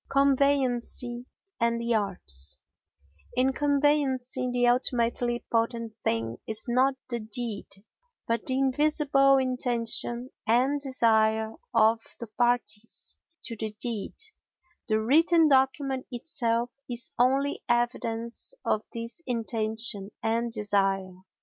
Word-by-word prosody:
Conveyancing 260 -3 +1 0.3
and 235 0 +2
the 235 0 0
Arts 180 - -2 0.8
In 260 +1 +3
conveyancing 275 -3 +1
the 245 0 +2
ultimately 240 -1 +1
potent 230 -1 0
thing 115 0 -1
is 220 0 -3
not 260 +3 +3
the 240 -2 -2
deed 220 -1 -5 0.6
but 230 -1 -1
the 260 - +1
invisible 275 0 +3
intention 245 -1 -1 0.2
and 255 +6 +3
desire 220 -4 +2 0.2
of 220 +1 +4 0.2
the 235 - -5
parties 230 -1 -1 0.3
to 230 - -3
the 220 0 -3
deed; 230 -5 -3 0.7
the 215 -2 +2
written 320 +8 +5
document 265 -1 +2
itself 240 -2 -1 0.2
is 240 -1 -4
only 270 +3 +2
evidence 240 - 0
of 215 - +1
this 230 +8 -4
intention 220 -3 -2
and 230 +1 0
desire. 195 -3 +1
240 Hz, 105 wpm, -28 LUFS, 225-260 Hz, 0.8 s, written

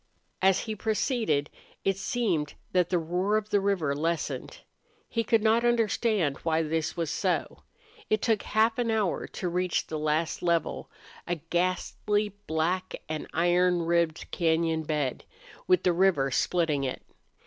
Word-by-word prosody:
As 190 0 +4
he 220 -2 -4
proceeded 215 - 0 0.3
it 195 - +2
seemed 190 -7 -1 0.2
that 180 -2 +2
the 180 - +2
roar 180 +5 0
of 215 0 -4
the 205 - +4
river 195 -8 +1
lessened. 165 +3 -3 0.5
He 230 - -1
could 225 0 +2
not 225 +1 +4
understand 220 - +1
why 165 0 0
this 160 +2 -2
was 165 -2 -1
so. - - -1 0.5
It 215 - +3
took 220 -1 +1
half 225 +2 +2
an 235 -1 +1
hour 215 -4 0
to 180 - -5
reach 180 0 0
the 155 - -4
last 155 +2 0
level, 170 -2 0 0.4
a 175 - 0
ghastly, 185 +5 -1 0.2
black, 175 +4 -1
and 155 -1 -4
iron 175 +1 +2
ribbed 170 -1 0
cañon 160 -2 +1
bed, 150 -4 -1 0.4
with 365 0 +4
the 180 - +3
river 170 -7 +3
splitting 155 -2 +1
it. 130 - -3
175 Hz, 150 wpm, -28 LUFS, 160-210 Hz, 0.5 s, As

